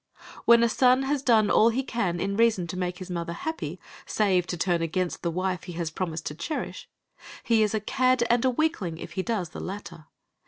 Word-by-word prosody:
When 235 0 +7
a - - +5
son 255 +3 +3
has 275 0 0
done 220 -5 +4
all 225 - +6
he 255 +4 -1
can 200 -9 -2
in 200 +3 -1
reason 225 -5 +3
to 170 - -6
make 180 -1 -2
his 185 0 -8
mother 170 -1 -3
happy, 320 - -5 0.3
save 190 -4 +1
to 175 - -3
turn 175 0 +1
against 175 +2 -2
the 170 - -1
wife 185 +1 -2
he 180 - -7
has 165 -2 -3
promised 165 -2 -4
to - - -3
cherish, 170 - -5 0.5
he 230 -2 +3
is 215 0 +2
a - - +1
cad 255 +3 +2
and 240 0 +2
a 260 - +4
weakling 245 - -1
if - - -8
he 190 - -2
does 195 -5 -2
the - - -9
latter. 180 -5 -7
195 Hz, 220 wpm, -26 LUFS, 175-235 Hz, 0.5 s, When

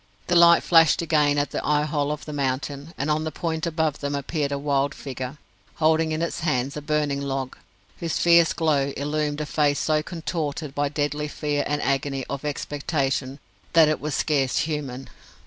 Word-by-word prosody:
The 175 - 0
light 170 0 +7
flashed 165 -1 +5
again 150 -3 +2
at 145 0 0
the - - -3
eye 150 0 +2
hole 150 -1 -1
of 150 - -5
the 150 - -6
mountain, 140 +2 -3
and 145 +2 -1
on 155 +1 +1
the 160 - -3
point 160 +2 -2
above 160 -2 -1
them 145 0 -2
appeared 140 +1 -2
a 140 - -1
wild 140 0 0
figure, 130 0 -6 0.4
holding 160 0 +2
in 155 +1 -1
its 170 - -3
hands 140 -5 -1
a 150 - -4
burning 145 -1 0
log, 135 -2 -3 0.4
whose 165 -1 -2
fierce 170 -1 +5
glow 145 -4 +1
illumined 150 +1 -1
a - - -2
face 145 -1 +1
so 155 -1 +1
contorted 155 -3 -4
by 145 0 0
deadly 150 0 -2
fear 145 -1 -2
and 145 0 -1
agony 135 -1 -1
of 140 0 -4
expectation 140 -2 -2 0.4
that 165 -2 +7
it 155 - -1
was 150 -2 -2
scarce 140 -4 +1
human. 140 -4 -4
150 Hz, 185 wpm, -24 LUFS, 140-155 Hz, 0.4 s, light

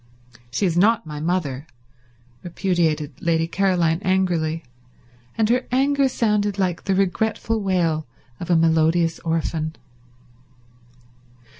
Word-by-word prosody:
"She 125 +11 -1
is 170 -3 0
not 205 +3 +3
my 150 -1 -6
mother," 155 -4 -2 0.7
repudiated 170 -4 -1
Lady 165 -1 +1
Caroline 175 -1 +1
angrily; 175 -4 0 0.7
and 220 - +2
her 250 +2 +1
anger 275 +1 +2
sounded 210 -4 0
like 185 -3 -1
the 195 - +1
regretful 220 +3 0
wail 170 -6 0 0.3
of 175 - -7
a 175 - +4
melodious 165 +1 +2
orphan. 160 -1 -2
175 Hz, 110 wpm, -22 LUFS, 160-200 Hz, 0.7 s, a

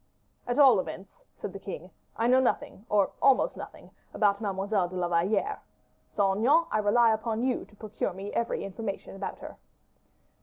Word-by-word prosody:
"At 245 - -1
all 265 -8 +7
events," 195 - -7
said - - -7
the - - -7
king, - - -8 0.3
"I 230 - 0
know 255 +2 +5
nothing, 240 -4 -1
or 205 -2 +3
almost 275 +2 +4
nothing, - - -10 0.2
about 200 -1 +2
Mademoiselle 195 -2 -1
de 185 - -9
la 180 -1 0
Valliere. 200 - 0 0.5
Saint 195 -2 +1
Aignan, 295 +9 +4
I 215 - +1
rely 220 +2 +4
upon 220 +1 -2
you 255 -1 0
to 210 - -22
procure 215 -1 -4
me 195 +3 -7
every 235 - -1
information 195 0 -6
about 195 - -5
her." - - -10
215 Hz, 175 wpm, -28 LUFS, 195-245 Hz, 0.5 s, all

